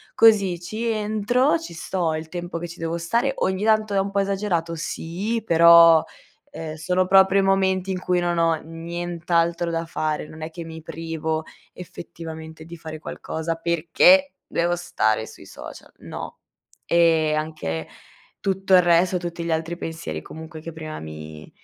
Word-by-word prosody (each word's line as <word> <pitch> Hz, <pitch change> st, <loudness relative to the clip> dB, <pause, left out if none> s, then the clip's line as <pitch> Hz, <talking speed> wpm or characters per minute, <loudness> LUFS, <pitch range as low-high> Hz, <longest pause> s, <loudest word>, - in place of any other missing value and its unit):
così 200 Hz, -6 st, +5 dB
ci 215 Hz, +6 st, -5 dB
entro, 225 Hz, +7 st, +1 dB
ci 325 Hz, -, -9 dB
sto 165 Hz, -1 st, -2 dB
il 155 Hz, 0 st, -4 dB
tempo 175 Hz, 0 st, -5 dB
che 175 Hz, +1 st, -5 dB
ci 170 Hz, -, -11 dB
devo 165 Hz, +1 st, -2 dB
stare 235 Hz, +11 st, 0 dB
ogni 190 Hz, +2 st, 0 dB
tanto 215 Hz, -1 st, +2 dB
è 195 Hz, -, +3 dB
un 195 Hz, +1 st, -1 dB
po' 200 Hz, -, +1 dB
esagerato? 190 Hz, -4 st, -1 dB
Sì, 190 Hz, +8 st, -3 dB
però, 165 Hz, -1 st, +7 dB, 0.5 s
ehm, 160 Hz, -1 st, -6 dB
sono 180 Hz, +4 st, 0 dB
proprio 190 Hz, 0 st, +5 dB
i -, -, +3 dB
momenti 190 Hz, -1 st, +1 dB
in 185 Hz, -, -2 dB
cui 180 Hz, -1 st, +1 dB
non 175 Hz, -1 st, 0 dB
ho 165 Hz, -1 st, +3 dB
nient'altro 170 Hz, +1 st, -2 dB
da 165 Hz, 0 st, -2 dB
fare. 155 Hz, -2 st, -2 dB
Non 155 Hz, 0 st, -12 dB
è 155 Hz, -, -4 dB
che 165 Hz, 0 st, -8 dB
mi 160 Hz, 0 st, -9 dB
privo 160 Hz, -1 st, -3 dB, 0.3 s
effettivamente 160 Hz, -2 st, -9 dB
di 170 Hz, +1 st, -9 dB
fare 155 Hz, -1 st, -8 dB
qualcosa 160 Hz, +1 st, -4 dB
perché 170 Hz, -, +4 dB
devo 175 Hz, +1 st, 0 dB
stare 110 Hz, -10 st, 0 dB
sui -, -, -13 dB
social, -, -, -11 dB
no. -, -, -8 dB, 0.5 s
E 165 Hz, -2 st, +3 dB
anche, 155 Hz, -, -3 dB, 0.5 s
tutto 195 Hz, 0 st, 0 dB
il 180 Hz, -, +8 dB
resto, 175 Hz, +1 st, +3 dB
tutti 170 Hz, -1 st, -5 dB
gli 170 Hz, -, -2 dB
altri 165 Hz, +2 st, -3 dB
pensieri, 120 Hz, -, -5 dB
comunque, 160 Hz, -, -10 dB
che 165 Hz, +1 st, -8 dB
prima 155 Hz, -1 st, -7 dB
mi 75 Hz, 0 st, -9 dB
170 Hz, 165 wpm, -23 LUFS, 160-190 Hz, 0.5 s, il